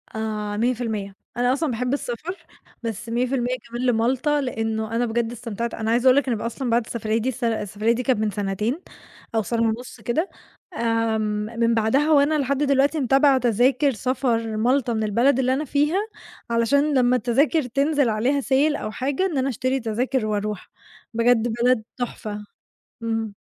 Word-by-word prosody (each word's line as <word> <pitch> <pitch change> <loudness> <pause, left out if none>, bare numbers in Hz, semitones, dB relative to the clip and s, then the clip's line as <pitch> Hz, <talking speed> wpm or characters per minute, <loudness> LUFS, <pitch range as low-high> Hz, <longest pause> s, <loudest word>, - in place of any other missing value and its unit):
آآ 210 -1 -3
100%، 220 -4 -1 0.2
أنا 245 +1 +3
أصلًا 295 +1 -1
باحب 250 +2 -1
السفر، 290 +7 -4 0.5
بس 225 0 -4
100% 250 +1 0
كمان 240 +2 -3
لمَالْطَا، 255 +5 +2
لأنه 225 -3 -2
أنا 240 +1 +2
بجد 230 0 -1
استمتعت 235 -1 -4
أنا 220 0 -2
عايزة 240 +2 +2
أقول 255 - +7
لك 285 - +2
أنا 240 -3 0
بقى 210 - -5
أصلًا 245 +2 -4
بعد 235 0 +2
السفرية 220 -1 -2
دي 230 +3 0
السف 255 0 -6
السفرية 220 -1 0
دي 240 +2 0
كانت 255 -4 +1
من 215 -1 0
سنتين، 210 - -2 0.5
أو 220 - +3
سنة 230 +2 -1
ونُص 230 +1 -2
كده، 245 - -1 0.5
آمم، 225 -1 -1
من 230 0 +3
بعدها 230 +8 +2
وأنا 300 +1 +4
لحد 280 0 0
دلوقتي 280 +2 +2
متابعة 270 +1 +4
تذاكر 255 +4 +3
سفر 230 -2 -1
مَالْطَا 245 +2 +2
من 220 -1 -1
البلد 240 +6 +2
اللي 260 0 +2
أنا 290 +4 -1
فيها، 295 +6 +1 0.5
علشان 280 +6 +2
لمّا 250 0 +3
التذاكر 265 +7 +2
تنزل 275 +1 +1
عليها 245 +6 +1
sale 280 +3 +2
أو 215 - -4
حاجة، 270 - -1
إن 340 -7 -1
أنا 265 +1 +1
أشتري 255 +2 -1
تذاكر 240 +2 -1
وأروح. 210 -2 -3 0.4
بجد 230 0 +3 0.2
بلد 250 -2 +3
تحفة. 215 -4 -5 0.6
إمم. 225 -2 -2
240 Hz, 170 wpm, -23 LUFS, 225-265 Hz, 0.6 s, أقول